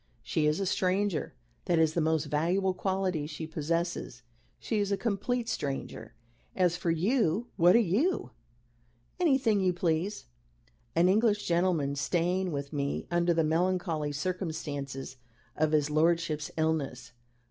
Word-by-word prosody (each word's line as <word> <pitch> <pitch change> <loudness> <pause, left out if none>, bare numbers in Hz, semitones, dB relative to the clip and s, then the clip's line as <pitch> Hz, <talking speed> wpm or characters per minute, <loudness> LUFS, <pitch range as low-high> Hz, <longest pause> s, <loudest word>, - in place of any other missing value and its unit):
She 155 -2 0
is 150 +3 +1
a 195 - 0
stranger. 185 -4 0 0.3
That 175 -3 +2
is 160 -1 +3
the 170 - +1
most 160 0 +1
valuable 175 +6 +1
quality 185 -5 -1
she 155 +1 -6
possesses. 160 -4 -3 0.3
She 220 - -2
is 205 -1 0
a 200 - +1
complete 230 +3 -1
stranger. 140 - -4 0.4
As 180 -2 +2
for 180 -1 -2
you, 210 +4 +1
what 175 +1 +5
are - - +7
you? 330 - +1 0.9
Anything 265 - +3
you 185 -1 +2
please. 175 +3 -1 0.7
An 170 +2 +4
English 210 +1 +2
gentleman 170 -5 +1
staying 175 +5 0
with 140 0 -4
me 140 -1 -2
under 175 0 +2
the 165 -1 +2
melancholy 165 -2 0
circumstances 145 -5 -4 0.4
of 155 0 +1
his 150 -1 +2
lordship's 160 -1 +1
illness. 140 -6 -1
170 Hz, 135 wpm, -29 LUFS, 155-190 Hz, 0.9 s, are